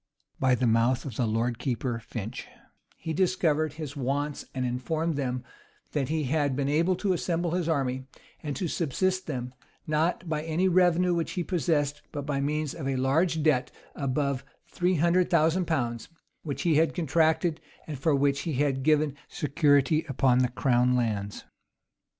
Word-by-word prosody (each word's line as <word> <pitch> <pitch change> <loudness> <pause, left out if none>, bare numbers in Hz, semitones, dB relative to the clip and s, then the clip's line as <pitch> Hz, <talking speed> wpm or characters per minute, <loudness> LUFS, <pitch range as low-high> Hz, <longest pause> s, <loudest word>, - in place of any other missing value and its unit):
By 130 -1 +3
the 125 - 0
mouth 115 +3 +2
of 130 -6 -6
the 120 - 0
lord 115 +2 -1
keeper 125 -1 -2
Finch, 115 -1 -6 0.5
he 160 -1 -4
discovered 160 -4 +1
his 155 -2 -7
wants, 140 +2 -2
and 130 -1 -1
informed 155 +7 -1
them, 125 -3 -2 0.5
that 140 -3 -1
he 160 0 0
had 145 0 0
been 140 0 -1
able 165 +6 +2
to 190 +1 0
assemble 170 -1 -1
his 175 -1 -1
army, 130 -4 -1 0.3
and 145 -3 -4
to 180 - -2
subsist 185 +5 -1
them, 125 -4 -4 0.3
not 160 +4 0
by 155 -2 -1
any 165 +4 0
revenue 180 -1 +3
which 170 -1 -1
he 180 - -1
possessed, 155 -5 0
but 145 -1 -5
by 140 -2 -1
means 150 +1 -1
of 155 -5 -5
a 135 - 0
large 155 +5 +1
debt 140 -5 +2 0.2
of 140 - -5
above 140 0 0 0.2
three 180 +1 0
hundred 170 +3 +3
thousand 170 +1 +3
pounds, 120 -7 -2 0.3
which 145 -4 -4
he 165 -4 +3
had 160 +1 +2
contracted, 160 0 +1 0.2
and 150 -4 -6
for 145 +2 +2
which 140 0 +2
he 165 - -3
had 135 0 +1
given 150 0 +2
security 145 0 +2
upon 130 -1 +3
the 125 -1 +2
crown 125 0 +2
lands. 105 -4 -2
145 Hz, 170 wpm, -27 LUFS, 130-165 Hz, 0.5 s, By